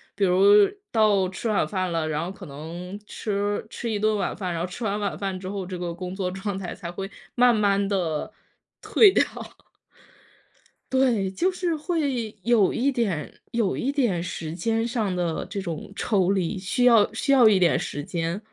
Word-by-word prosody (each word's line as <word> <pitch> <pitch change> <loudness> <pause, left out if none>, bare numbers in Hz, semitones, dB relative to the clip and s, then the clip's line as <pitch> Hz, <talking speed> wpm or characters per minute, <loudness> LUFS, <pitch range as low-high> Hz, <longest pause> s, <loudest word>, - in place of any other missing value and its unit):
比 205 - -1
如 200 +3 +6 0.2
到 210 -4 +3
吃 190 +5 -4
晚 210 - +1
饭 185 -3 -2
了， 165 -2 -1
然 150 0 -1
后 175 - -4
可 195 - -11
能 170 +7 -8
吃 205 0 -2
吃 230 +1 -5
一 210 - -1
顿 215 +1 +2
晚 195 - -2
饭。 185 -3 -3
然 165 - -3
后 - - 0
吃 190 +6 -8
完 205 -1 0
晚 205 -1 -2
饭 195 -2 -2
之 185 - -6
后， 195 -1 -4
这 185 -1 -5
个 175 -1 -4
工 180 +1 -6
作 185 -2 -2
状 195 +1 -4
态 185 -2 -5
才 175 -3 -7
会 195 +2 -6 0.3
慢 245 0 +5
慢 200 -2 +2
地 180 -1 -1 0.5
退 420 -3 +6
掉。 - - +4 1.7
对， 245 -7 +2
就 350 - +1
是 360 -2 -1
会 285 - -2
有 230 -5 +4
一 270 +4 +1
点 210 - -2 0.2
有 230 -5 0
一 270 - -1
点 240 -12 +1
时 165 -2 -5
间 225 +6 0
上 220 -6 -1
的 175 -2 -1
这 205 - -4
种 170 -1 -6
抽 195 -5 +1
离， 190 -2 0
需 190 +7 -1
要 230 -4 +6
需 260 +5 -1
要 255 -4 +7
一 205 - +4
点 175 -3 +3
时 145 - -4
间。 170 +3 -3
200 Hz, 205 characters per minute, -25 LUFS, 180-225 Hz, 1.7 s, 要